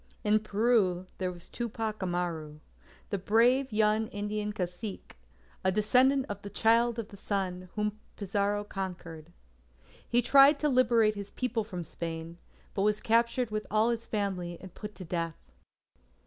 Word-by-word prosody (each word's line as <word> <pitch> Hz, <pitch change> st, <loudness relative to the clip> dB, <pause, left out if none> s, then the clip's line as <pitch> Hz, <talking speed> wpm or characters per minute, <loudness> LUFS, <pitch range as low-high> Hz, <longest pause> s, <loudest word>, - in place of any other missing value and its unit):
In 215 Hz, +1 st, +4 dB
Peru, 210 Hz, -4 st, +2 dB
there 185 Hz, -1 st, -1 dB
was 175 Hz, -1 st, -9 dB
Tupac 220 Hz, -2 st, -4 dB
Amaru, 170 Hz, -4 st, -3 dB, 0.5 s
the 200 Hz, -, 0 dB
brave 240 Hz, +7 st, +3 dB
young 215 Hz, +1 st, +2 dB
Indian 210 Hz, 0 st, -3 dB
Cacique, 185 Hz, +1 st, -5 dB, 0.5 s
a 190 Hz, -, +3 dB
descendant 255 Hz, +7 st, +3 dB
of 205 Hz, -1 st, -6 dB
the 200 Hz, -, -7 dB
"Child 230 Hz, +3 st, +3 dB
of 225 Hz, -2 st, -4 dB
the 200 Hz, -, -12 dB
Sun" 185 Hz, -2 st, -3 dB
whom 210 Hz, 0 st, -1 dB, 0.2 s
Pizarro 200 Hz, +1 st, -1 dB
conquered. 175 Hz, -5 st, -6 dB, 0.8 s
He 240 Hz, +1 st, +3 dB
tried 275 Hz, +4 st, +7 dB
to 300 Hz, +1 st, +1 dB
liberate 235 Hz, -4 st, +4 dB
his 205 Hz, -1 st, -7 dB
people 240 Hz, -2 st, -2 dB
from 180 Hz, -5 st, -6 dB
Spain, 165 Hz, +1 st, -6 dB, 0.3 s
but 195 Hz, -, -1 dB
was 210 Hz, +1 st, +2 dB
captured 235 Hz, +1 st, +2 dB
with 215 Hz, 0 st, -3 dB
all 215 Hz, +2 st, +3 dB
his 230 Hz, -1 st, -4 dB
family, 185 Hz, -5 st, -2 dB
and 190 Hz, -, -11 dB
put 210 Hz, 0 st, -8 dB
to 185 Hz, -, -8 dB
death. 165 Hz, -1 st, -3 dB
210 Hz, 150 wpm, -30 LUFS, 185-225 Hz, 0.8 s, tried